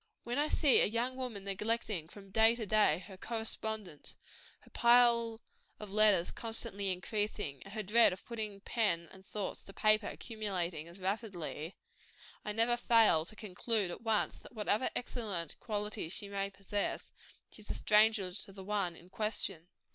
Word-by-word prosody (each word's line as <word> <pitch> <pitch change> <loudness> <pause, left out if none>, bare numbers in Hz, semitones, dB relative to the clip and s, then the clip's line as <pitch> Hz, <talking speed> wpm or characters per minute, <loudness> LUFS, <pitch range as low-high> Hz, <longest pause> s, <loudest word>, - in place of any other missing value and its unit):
When 240 +3 -2
I 300 - +2
see 290 -3 +5
a - - +4
young 235 +4 -1
woman 250 -6 -5
neglecting, 200 -3 -2
from 195 0 -13
day 225 +3 +5
to 230 -2 -4
day, 205 -5 +3
her 190 -2 -11
correspondents 220 -5 -3 0.4
her - - -20
pile 235 -1 +4 0.4
of 210 -2 -8
letters 205 -4 +5
constantly 225 -4 +1
increasing, 205 -5 -3
and 195 +2 -10
her 215 - -2
dread 225 +4 +6
of 185 - -8
putting 215 -4 -5
pen 195 -8 0
and 190 0 -13
thoughts 200 0 -4
to 195 - -11
paper 215 0 +3
accumulating 185 -8 -3
as 170 +3 -12
rapidly 185 -5 -4 0.7
I 210 - -3
never 230 +3 +3
fail 225 -9 +5
to 215 - -4
conclude, 210 -1 -1
at - - -7
once, 225 -2 0
that - - -14
whatever 215 +2 +1
other - - 0
excellent 205 - -3
qualities 210 -6 -3
she 200 - -3
may 200 0 -2
possess, 200 +1 -3 0.4
she - - -9
is 210 - -3
a - - -2
stranger 210 -3 +3
to 195 +2 -5
the 195 0 -10
one 195 -4 -1
in 170 - -15
question. 200 -6 -1
210 Hz, 170 wpm, -33 LUFS, 190-225 Hz, 0.7 s, dread